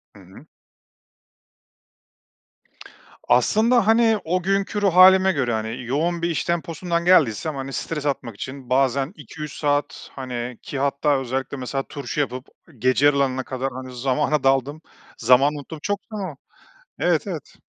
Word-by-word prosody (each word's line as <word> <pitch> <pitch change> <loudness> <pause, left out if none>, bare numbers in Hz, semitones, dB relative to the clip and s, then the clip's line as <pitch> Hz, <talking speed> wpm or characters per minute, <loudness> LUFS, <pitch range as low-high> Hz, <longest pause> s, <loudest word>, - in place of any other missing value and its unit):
Hı - - -14
hı. - - -15 2.8
Aslında, 225 0 +3
hani, 225 -1 +4
o 180 +3 0
günkü 195 +2 0
ruh 195 -4 +2
hâlime 190 +1 +7
göre, 130 -8 -1
hani, 110 +3 -3
yoğun 160 +8 -1
bir 170 - 0
iş 160 - -1
temposundan 170 0 -2
geldiysem, 155 - +3
hani, 135 0 -6
stres 150 -3 -4
atmak 125 -6 -2
için 130 +4 -8
bazen 135 +3 +1
2-3 150 -7 -9
saat, 145 0 -1
hani, 125 -2 -5
ki 140 - -6
hatta 140 +1 +1
özellikle 135 +1 -3
mesela 135 +2 -3
turşu 140 -1 -5
yapıp 130 -2 -2 0.3
gece 130 +4 +2
yarılarına 135 -2 +2
kadar, 130 +1 -3
hani, 130 0 -8
zamana 140 +3 0
daldığım, 135 +3 +1 0.4
zamanı 130 +5 +4
unuttuğum 150 +2 -9
çok 205 +3 -1
zaman 190 -9 -5 0.6
Evet, - - +1
evet. - - -7
140 Hz, 140 wpm, -22 LUFS, 130-170 Hz, 2.8 s, hâlime